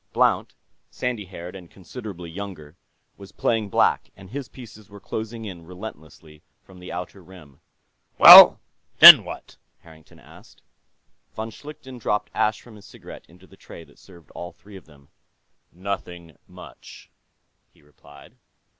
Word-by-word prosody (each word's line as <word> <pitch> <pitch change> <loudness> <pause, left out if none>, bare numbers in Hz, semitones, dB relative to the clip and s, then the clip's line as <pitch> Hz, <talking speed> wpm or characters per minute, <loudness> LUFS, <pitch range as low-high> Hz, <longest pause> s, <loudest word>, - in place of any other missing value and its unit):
Blount, - - -1 0.3
sandy 120 -5 -6
haired 90 -1 -12
and 90 -3 -14
considerably 95 -2 -11
younger, 85 -5 -11 0.4
was 100 -1 -15
playing 110 -3 -3
black, - - -1
and 95 0 -16
his 140 -1 -8
pieces 110 -4 -16
were 100 0 -15
closing 110 +2 -8
in 90 -5 -11
relentlessly 80 -4 -14 0.2
from 95 -1 -19
the 90 - -12
outer 90 +2 -9
rim. 80 -5 -18 0.6
"Well, - - +9 0.4
then - - +10
what?" - - -12 0.2
Harrington 80 -2 -20
asked. - - -21 0.7
Von 110 +1 -7
Schlichten 130 -1 -13
dropped 105 -2 -4
ash 105 0 -2
from 115 -3 -17
his 100 - -18
cigarette - - -15
into 90 +2 -21
the 95 - -21
tray 85 - -15
that - - -24
served 85 -4 -20
all 85 - -10
three 100 -1 -19
of 95 - -15
them. 70 -3 -23 0.6
"Nothing 90 -3 -9
much," - - -16 0.6
he - - -29
replied. 75 -1 -20
95 Hz, 145 wpm, -21 LUFS, 85-105 Hz, 0.7 s, then